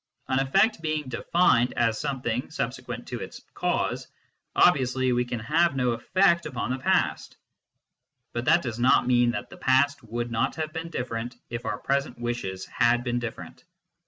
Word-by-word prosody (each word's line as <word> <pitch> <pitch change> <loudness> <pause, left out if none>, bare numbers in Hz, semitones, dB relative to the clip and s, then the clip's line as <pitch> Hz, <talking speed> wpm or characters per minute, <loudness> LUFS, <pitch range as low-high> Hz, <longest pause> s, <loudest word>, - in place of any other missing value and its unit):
An 130 0 +1
effect 195 - +2
being 155 -3 -2
defined 125 -1 +2
as 115 -2 +1
something 125 -4 -2
subse - - -3
quent - - -6
to - - -5
its - - -8
cause, - - -1 0.5
obviously 130 -1 +3
we 120 0 +2
can 120 -1 -4
have 155 +6 +2
no 125 -2 +1
effect 170 +7 +2
upon 125 -3 -3
the 130 - -2
past. - - 0 1.0
But 120 +1 -3
that 170 +3 +4
does 120 -3 -4
not 125 +2 +4
mean 120 -1 +4
that 120 - -4
the - - -11
past 140 +2 +2
would 120 +1 -4
not 115 - 0
have 155 -1 -4
been 165 0 -5
different 120 -4 -4 0.2
if 120 0 -5
our - - -1
present 140 +1 -1
wishes 120 -6 -4
had 120 0 +2
been 120 -1 -1
different. 120 -2 -7
125 Hz, 170 wpm, -26 LUFS, 120-150 Hz, 1.0 s, that